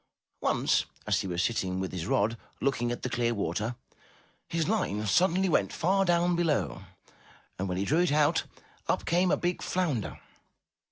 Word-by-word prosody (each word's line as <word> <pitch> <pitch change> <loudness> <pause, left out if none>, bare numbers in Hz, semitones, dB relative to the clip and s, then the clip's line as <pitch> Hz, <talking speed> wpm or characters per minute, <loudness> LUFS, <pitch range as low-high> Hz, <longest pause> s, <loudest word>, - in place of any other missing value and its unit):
Once, - - +2 0.2
as - - +2
he - - -4
was 85 -1 -1
sitting 95 -2 -1
with 95 0 -3
his 90 -2 -4
rod, 110 +3 +2 0.2
looking 120 -3 0
at 120 - -5
the - - 0
clear 120 -1 0
water, 105 +5 -2 0.7
his 165 -2 0
line 145 - 0
suddenly 185 - +3
went 170 - +2
far 195 +3 +2
down 175 0 +3
below 150 - 0 0.8
and 95 0 -2
when 90 - -2
he 95 - 0
drew 155 - +2
it 180 -4 +3
out, 150 +2 +3 0.4
up - - 0
came 180 +2 +2
a - - +3
big 175 0 -1
flounder. 155 - -1
135 Hz, 170 wpm, -29 LUFS, -, 0.8 s, suddenly